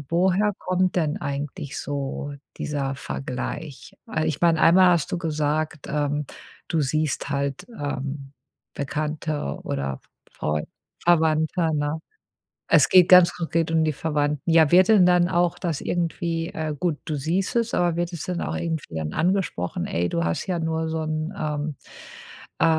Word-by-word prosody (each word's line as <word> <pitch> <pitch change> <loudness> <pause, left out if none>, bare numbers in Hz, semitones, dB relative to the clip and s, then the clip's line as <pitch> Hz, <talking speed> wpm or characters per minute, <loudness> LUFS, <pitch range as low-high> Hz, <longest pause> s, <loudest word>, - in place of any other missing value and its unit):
Woher 190 +4 +2
kommt 185 0 0
denn 155 -4 0
eigentlich 140 -1 -4
so 145 0 -4 0.2
dieser 140 -2 -2
Vergleich? 135 +2 -6
Weil 155 -9 -1
ich 150 - -2
mein, 170 -1 +4
einmal 180 +3 +6
hast 170 -5 +1
du 175 - -1
gesagt, 155 -1 -2
ähm, 145 0 -1 0.4
du 165 - +1
siehst 150 +1 -1
halt, 140 -1 -2
ähm, 140 -1 -4 0.4
Bekannte 150 - -3
oder 70 -1 -3 0.3
Freu 75 0 -2 0.4
Verwandte, 160 0 +2
ne? 145 +1 -1 0.7
Es - - +5
geht 180 -2 +7
ganz 180 -2 +8
konkret 165 -1 -1
um 160 -1 +3
die 155 -1 +1
Verwandten. 150 +1 -1
Ja, 160 -2 +6
wird 185 +3 +6
denn 205 -5 +7
dann 180 -1 +4
auch 175 -2 +1
das 165 -6 -2
irgendwie 170 -1 -2
äh, 155 -4 -3
gut, 165 0 0
du 155 - -2
siehst 170 - -1
es 235 -1 +1
aber 175 -2 +2
wird 175 0 -1
es 165 - -5
dann 180 -1 -3
auch - - -2
irgendwie 160 - -3
dann 75 -1 -3
angesprochen: 175 - 0
„Ey, 85 +1 -1
du 85 - -1
hast 85 0 -1
ja 180 -3 -1
nur 160 0 -1
so 160 0 -2
'n 155 +3 -3
ähm, 150 -2 -2 0.8
äh, - - +4
155 Hz, 160 wpm, -24 LUFS, 145-170 Hz, 0.8 s, ganz